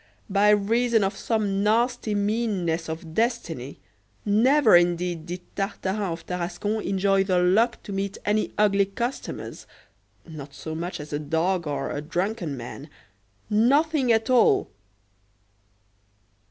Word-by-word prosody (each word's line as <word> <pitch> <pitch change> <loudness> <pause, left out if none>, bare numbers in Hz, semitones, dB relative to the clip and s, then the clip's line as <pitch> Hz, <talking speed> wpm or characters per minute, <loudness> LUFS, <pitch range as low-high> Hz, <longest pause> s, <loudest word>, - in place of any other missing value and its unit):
by 205 +1 +4
reason 225 +2 +3
of 195 +1 -1
some 205 -4 -1
nasty 230 +1 +1
meanness 200 -6 -1
of 160 0 -6
destiny, 170 - -2 0.5
never 230 +3 +5
indeed 175 -1 +1
did 180 +1 -5
Tartarin 195 -1 -2
of 165 0 -7
Tarascon 180 +4 -3
enjoy 195 0 +2
the 185 -2 +1
luck 205 +7 +2
to - - -8
meet 195 0 -3
any 210 +1 +1
ugly 200 -2 +3
customers 240 +6 -5 0.6
not 145 -4 -10
so 160 - -6
much 170 +3 -4
as 150 0 -8
a 145 - -1
dog 165 +3 -1
or 145 - -3
a 145 - -3
drunken 175 - -3
man 125 +5 -8 0.6
nothing 265 +5 +3
at 220 0 +2
all! 255 -3 +3
195 Hz, 125 wpm, -25 LUFS, 170-220 Hz, 0.6 s, never